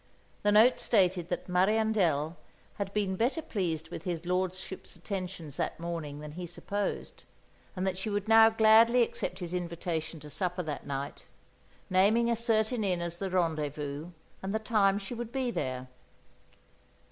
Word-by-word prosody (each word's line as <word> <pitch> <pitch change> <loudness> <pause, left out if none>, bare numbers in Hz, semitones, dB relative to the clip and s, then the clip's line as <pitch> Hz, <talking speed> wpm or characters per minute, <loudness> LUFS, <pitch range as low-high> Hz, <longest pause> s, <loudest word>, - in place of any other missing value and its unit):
The 205 - +3
note 220 +4 +6
stated 185 -5 +2
that 175 - -3
"Mariandel" 180 -5 +2 0.4
had 200 -1 -2
been 200 -2 0
better 240 - +1
pleased 165 - -2
with - - -6
his 175 -2 -4
lordship's 185 +1 -3
attentions 175 -5 -5
that - - -2
morning 165 -4 -5
than 150 0 -7
he 175 +3 -6
supposed, 200 +4 -4 0.5
and 185 0 -2
that 190 -1 -1
she 200 - -2
would 205 0 -2
now 225 0 +8
gladly 225 +2 +6
accept 185 -5 -3
his 175 -2 -5
invitation 170 -2 -3
to 150 - -10
supper 180 +1 -1
that 150 -2 -5
night, 140 0 -5 0.6
naming 215 +6 +4
a - - +3
certain 225 0 +1
inn 185 -3 +1
as 170 0 -4
the 195 +1 -3
rendezvous, 155 -4 -1 0.3
and 195 +2 -3
the - - +4
time 210 -3 +2
she 200 +3 -6
would 235 -1 -5
be 260 -2 -1
there. 130 - -3
185 Hz, 160 wpm, -30 LUFS, 170-215 Hz, 0.6 s, now